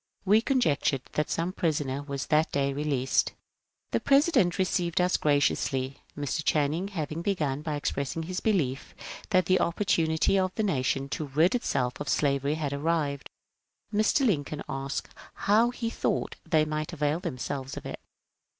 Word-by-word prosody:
We 210 +3 +5
con 265 +2 +1
jectured 140 - +1
that 150 - 0
some 170 +3 -1
prisoner 145 -6 -1
was 140 -2 -4
that 155 +1 +2
day 140 -1 0
released. 140 -2 +1 0.6
The - - +2
Presi 280 +4 +4
dent 180 - +3
received 180 -2 0
us 180 0 +3
graciously. 140 -2 +1 0.2
Mr. 145 +2 -2
Channing 155 +6 +1
having 160 -4 -4
begun 150 -8 -1
by 155 -1 -3
expressing 145 +2 -2
his 180 +3 -3
belief 150 - -1 0.3
that 185 -3 +3
the 185 0 +3
opportunity 170 0 +2
of 185 0 -1
the 220 - 0
nation 135 -6 0
to 155 - -3
rid 155 +7 +3
itself 125 - -1
of 145 - -4
slavery 140 0 +1
had 150 -3 -2
arrived, 145 -1 -1 0.6
Mr. 215 +6 +3
Lincoln 150 - 0
asked 135 0 -4 0.3
how 220 +4 +3
he 235 -2 -3
thought - - -1
they 155 -2 +4
might 155 +2 -3
avail 150 0 0
themselves 135 -2 -4
of - - -7
it. - - -6
155 Hz, 160 wpm, -28 LUFS, 140-185 Hz, 0.6 s, We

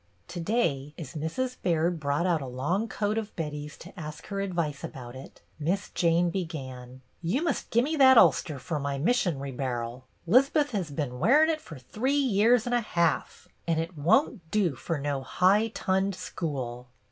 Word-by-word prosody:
To 175 0 -6
day, 165 - 0
as 150 -6 -8
Mrs. 205 - -3
Baird 170 0 +1
brought 145 +3 0
out 170 -4 +2
a 135 - -5
long 145 - -1
coat 210 0 -1
of 215 -1 -7
Betty's 150 -2 -5
to 180 - -12
ask 150 -1 -7
her 200 -1 -2
advice 170 -7 -2
about 125 -1 -8
it. 130 - -12 0.2
Miss 180 +7 -1
Jane 170 0 +2
began, 130 -8 -6
— - - -41
" - - -40
You 195 - 0
must 340 - -1
gimme 270 +8 +1
that 260 -2 +7
ulster 155 -8 +4
fer 150 +3 -3
my 140 0 -2
mis 210 - +2
sion'ry 140 -7 -2
bar'l. 125 -1 -4 0.2
'Lizbeth 275 - +4
has 190 -8 -2
been 140 -4 -4
wearin' 295 - +5
it 310 -1 -3
fer 160 - -10
three 225 - -2
years 240 -3 +3
an' 245 - -1
a 240 - +3
ha'f, 170 -7 -1 0.2
and 165 -1 +1
it 165 +2 -4
won't 180 - +2
do 195 -6 +1
fer 165 +6 -3
no 140 -1 -2
high 195 +10 +3
tunned 190 -2 0
school. 125 -9 -5
170 Hz, 185 wpm, -28 LUFS, 140-210 Hz, 0.2 s, that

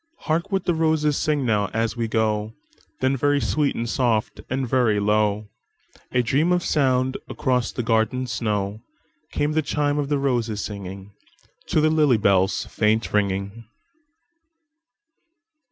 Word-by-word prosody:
"Hark 170 +5 -1
what 195 -2 -1
the 175 - +2
roses 155 -2 +1
sing 150 -2 0
now, 105 -4 +1
as 115 0 0
we 115 -1 -2
go;"Then 110 +4 -2
very 145 +2 +2
sweet 150 0 0
and 115 - -3
soft, 115 -4 0
and 130 0 -1
very 115 -4 +2
low,—A 105 +3 -2
dream 145 +9 +1
of 180 -1 +2
sound 130 -3 +1
across 125 -2 0
the 125 - -3
garden 115 +3 +1
snow,—Came 110 +8 -4
the 155 +1 +1
chime 145 0 0
of 145 -1 -2
roses 120 -7 0
singingTo 100 -1 -8 0.7
the 155 - +4
lily 150 -6 +4
bell's 95 -1 +2
faint 110 +1 0
ringing. 100 +2 -1
120 Hz, 125 wpm, -23 LUFS, 105-145 Hz, 0.7 s, the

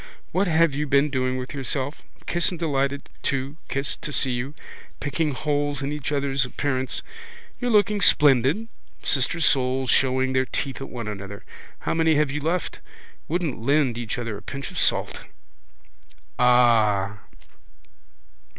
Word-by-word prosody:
What 190 +3 +1
have 165 -2 +3
you 150 +2 -2
been 140 +1 +3
doing 130 -1 0
with 130 +2 -6
yourself? 140 +1 -2 0.2
Kiss 175 0 +2
and 180 - -5
delighted 140 -3 -1
to, 135 +1 -2
kiss, 140 +1 0
to 150 - -5
see 135 -2 +3
you. 130 +4 -3 0.4
Picking 150 +1 -1
holes 145 -1 -1
in 140 - -2
each 150 -1 -4
other's 140 -2 +1
appearance. 130 +1 -2 0.6
You're 245 - -1
looking 210 -2 +3
splendid. 145 - +4 0.4
Sister 140 +5 0
souls. 130 -4 +2
Showing 130 0 +2
their 130 0 +1
teeth 135 -1 -3
at 135 - -6
one 120 -3 -6
another. 100 -1 -7 0.4
How - - -1
many 160 -1 +3
have 150 -2 +2
you 150 +1 -3
left? 170 +4 -2 0.5
Wouldn't 165 -7 -2
lend 140 -1 +2
each 120 -2 -4
other 115 -4 -4
a - - -11
pinch 140 -1 -6
of - - -3
salt. - - +1 1.2
Ah! 110 -5 +4
140 Hz, 150 wpm, -24 LUFS, 130-150 Hz, 1.2 s, splendid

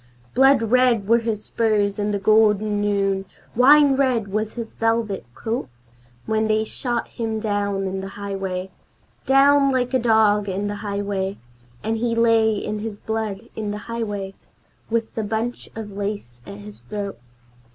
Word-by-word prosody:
Blood 270 -1 +5
red 235 -2 +3
were 230 +2 +5
his 225 -2 -3
spurs 210 -3 +1
in 205 0 0
the 205 - 0
golden 210 0 +3
noon, 195 -1 0 0.3
wine 280 +3 +6
red 255 -6 +1
was 215 +2 -2
his 230 -2 -6
velvet 225 - -1
coat 230 - -3 0.6
When 220 0 +1
they 215 0 +2
shot 240 +2 -3
him 225 -1 -3
down 205 -2 -1
in 190 0 -3
the 195 - -6
highway, 195 -2 -4 0.6
Down 275 +1 +5
like 255 -1 0
a 260 - +3
dog 215 -3 +3
in 195 +2 -2
the 205 0 -4
highway, 200 -1 -2 0.5
And 225 +1 -1
he 230 0 0
lay 225 -1 +4
in 210 +1 -3
his 210 -1 -6
blood 220 -1 -4
in 215 -2 -3
the 205 - -3
highway, 205 -4 -4 0.6
with 230 0 -1
the 220 - -2
bunch 225 +3 -3
of 220 -2 -6
lace 200 - -5
at 200 - -8
his 205 0 -11
throat. 205 -2 -5
215 Hz, 160 wpm, -22 LUFS, 200-230 Hz, 0.6 s, wine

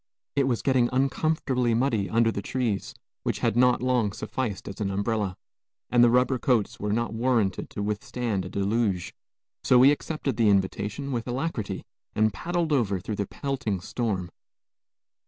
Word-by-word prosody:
It 140 -2 +2
was 120 -3 0
getting 130 -3 +3
uncomfortably 130 -2 +1
muddy 115 -6 +1
under 115 +1 +3
the 100 - -4
trees, 120 -6 -2 0.3
which - - -1
had - - +1
not 125 0 +4
long 125 -6 +1
sufficed 110 0 -4
as 100 +2 -7
an 100 - 0
umbrella, 100 -1 -1 0.5
and 120 -1 +6
the 120 - +7
rubber 125 +1 +3
coats 120 -6 +1
were 105 0 -2
not 115 +2 0
warranted 115 -5 0
to 105 - -4
withstand 105 0 -2
a 90 - -6
deluge, 100 -2 0 0.5
so 125 - +5
we 130 +3 +8
accepted 145 -2 -2
the 115 -3 +4
invitation 100 +7 0
with 120 -2 -2
alacrity 125 -4 -3 0.3
and 110 -1 +3
paddled 170 - -1
over 105 -8 +1
through 105 +3 -5
the 100 - -2
pelting 130 -9 -3
storm. 95 -2 -3
115 Hz, 160 wpm, -26 LUFS, 100-130 Hz, 0.5 s, we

